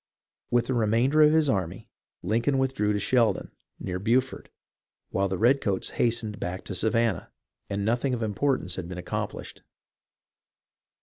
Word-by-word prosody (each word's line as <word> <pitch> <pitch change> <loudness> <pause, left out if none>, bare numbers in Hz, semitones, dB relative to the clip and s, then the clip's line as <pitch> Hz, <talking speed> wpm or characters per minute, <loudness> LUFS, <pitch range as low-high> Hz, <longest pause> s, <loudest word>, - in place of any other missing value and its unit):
With 120 -1 +2
the 130 - -1
remainder 120 +6 +3
of 150 0 +7
his 160 -1 +3
army 95 -7 -2 0.4
Lincoln 115 +8 +1
withdrew 130 -6 +1
to 105 - 0
Sheldon, 115 -2 +1 0.3
near 90 0 -4
Beaufort, 125 +6 0 0.6
while 100 +1 +1
the 95 - -2
redcoats 115 -4 +1
hastened 115 -3 -1
back 90 +1 -5
to - - -5
Savannah, 110 -1 0 0.4
and 100 0 -2
nothing 120 +4 +1
of 115 - -3
importance 110 -3 -1
had 90 -2 -5
been 90 - -6
accomplished. 90 - -5
115 Hz, 140 wpm, -26 LUFS, 100-130 Hz, 0.6 s, of